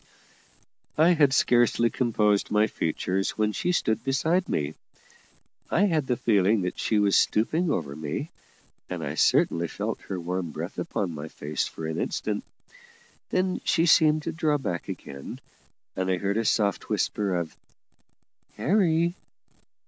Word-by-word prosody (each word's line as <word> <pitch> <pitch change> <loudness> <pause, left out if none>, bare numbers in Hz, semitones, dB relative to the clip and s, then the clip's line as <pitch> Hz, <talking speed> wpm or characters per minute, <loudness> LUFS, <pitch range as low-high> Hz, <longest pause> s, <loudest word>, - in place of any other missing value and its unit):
I 160 +3 +5
had 150 -6 +4
scarcely 120 -3 +3
composed 105 -5 +1
my 105 0 +3
features 95 -2 -2
when 105 -1 +1
she 175 +11 -1
stood 110 -10 0
beside 160 +7 +1
me. 75 0 -1 1.0
I 170 - +2
had 160 -8 +1
the 125 - 0
feeling 105 -2 +2
that 90 - -4
she 110 - +1
was 100 -1 +3
stooping 155 +11 +2
over 75 - -2
me, 75 -1 -4 0.6
and - - -4
I - - -3
certainly 85 0 +2
felt - - -4
her 95 - -3
warm 90 0 -3
breath - - -6
upon 90 -4 -2
my 75 0 -6
face 75 0 -3
for 80 - -7
an 80 0 -3
instant; - - -2 0.9
then 185 0 0
she 165 - +2
seemed 155 -2 +4
to 165 - -2
draw 155 -2 +1
back 90 - -4
again, 70 0 -7 0.6
and 95 0 -1
I 95 - +2
heard 100 +3 -1
a 115 - 0
soft 100 -2 +1
whisper 100 -3 0
of 85 -2 -3 1.0
"Harry." 170 -2 +2
110 Hz, 150 wpm, -26 LUFS, -, 1.0 s, I